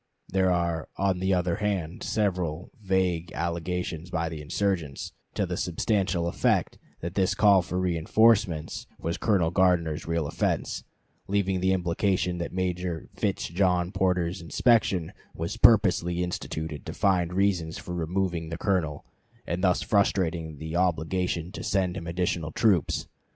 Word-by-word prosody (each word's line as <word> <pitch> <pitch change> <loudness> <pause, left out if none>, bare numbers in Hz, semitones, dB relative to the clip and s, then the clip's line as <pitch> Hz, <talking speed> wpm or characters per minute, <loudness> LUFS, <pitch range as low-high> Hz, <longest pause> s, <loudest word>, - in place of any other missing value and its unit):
There 95 -1 +2
are, 85 -2 -1
on 95 -2 +1
the 95 +1 0
other 90 0 0
hand, 95 -6 -2
several 90 -6 -1
vague 90 -4 0
allegations 85 0 -3
by 80 -2 -1
the 80 -2 -6
insurgents, 80 -2 -2 0.2
to - - +1
the - - -3
substantial 90 0 0
effect 85 - +1 0.2
that 85 +1 -4
this 95 0 +1
call 100 -2 +6
for 90 +1 -3
reënforcements 90 -1 +2
was 85 +2 -3
Colonel 95 -7 +2
Gardner's 85 -5 +2
real 85 -1 0
offense; - - -1 0.4
leaving 95 -2 +1
the 95 +1 +2
implication 90 0 0
that 85 - -3
Major 90 -2 -2
Fitz - - -1
John 90 0 +1
Porter's 90 -3 0
inspection 95 - +2 0.2
was 85 +7 -4
purposely 90 -6 +4
instituted 80 -3 -4
to - - -4
find 90 -3 +2
reasons 90 -4 +1
for 90 - -7
removing 85 -1 -1
the 80 - -4
Colonel 85 -7 -1 0.4
and 85 +3 -3
thus 90 -2 +3
frustrating 85 -6 +1
the 80 +3 -5
obligation 90 0 0
to - - -7
send 95 -3 0
him 85 -4 -6
additional 85 -2 -1
troops. 95 - +2
90 Hz, 140 wpm, -27 LUFS, 85-95 Hz, 0.4 s, call